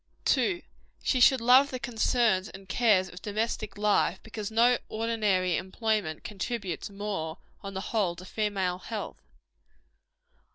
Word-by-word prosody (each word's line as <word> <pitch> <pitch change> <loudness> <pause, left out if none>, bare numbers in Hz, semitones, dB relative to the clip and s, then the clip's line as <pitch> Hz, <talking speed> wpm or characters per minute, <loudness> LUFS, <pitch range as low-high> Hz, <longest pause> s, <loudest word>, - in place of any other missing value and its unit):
2. 350 -3 +2 0.4
She 255 - +2
should 255 0 +6
love 255 +4 +6
the 255 - -4
concerns 230 -4 +1
and 195 0 -12
cares 200 -3 +3
of 180 0 -11
domestic 215 +1 -3
life, 205 -3 +2
because 215 -2 -5
no 235 +2 +4
ordinary 210 -5 +1
employment 195 -4 -2
contributes 205 -4 -4
more, 195 -5 -4 0.2
on 195 0 -7
the 190 - -2
whole, 195 -6 +1
to 180 +1 -11
female 190 -3 -1
health. 215 +2 -6
210 Hz, 130 wpm, -28 LUFS, 190-230 Hz, 0.4 s, should